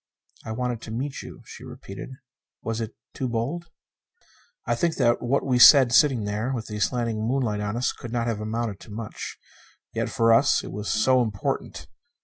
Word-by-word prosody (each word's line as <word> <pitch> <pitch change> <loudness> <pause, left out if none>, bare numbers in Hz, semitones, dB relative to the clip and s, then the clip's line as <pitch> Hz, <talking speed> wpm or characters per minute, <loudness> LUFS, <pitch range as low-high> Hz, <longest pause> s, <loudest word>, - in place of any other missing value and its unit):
"I 110 - -6
wanted 120 0 -2
to - - -9
meet 130 +5 -4
you," - - -11
she - - -11
repeated. 100 +5 -9 0.5
"Was 115 0 -2
it 110 0 -5 0.2
too 130 - -3
bold?" 140 +10 -3 1.0
I - - +1
think 170 -2 0
that 120 0 +2
what 130 +3 0
we 125 -2 +2
said 130 -2 +9
sitting 135 -5 +4
there 105 +5 -2
with 115 -3 -4
the 105 -1 -6
slanting 115 0 0
moonlight 115 -2 0
on 105 +2 -2
us, 125 - +1
could 120 - -9
not 120 -1 -1
have 115 -3 -2
amounted 110 -1 -3
to - - -14
much. 110 +1 -6 0.6
Yet - - -1
for 115 0 +3
us, 135 +5 +4
it - - -7
was 105 +1 -5
so 130 +4 +3
important! 105 -4 -3
115 Hz, 185 wpm, -25 LUFS, 110-125 Hz, 1.0 s, said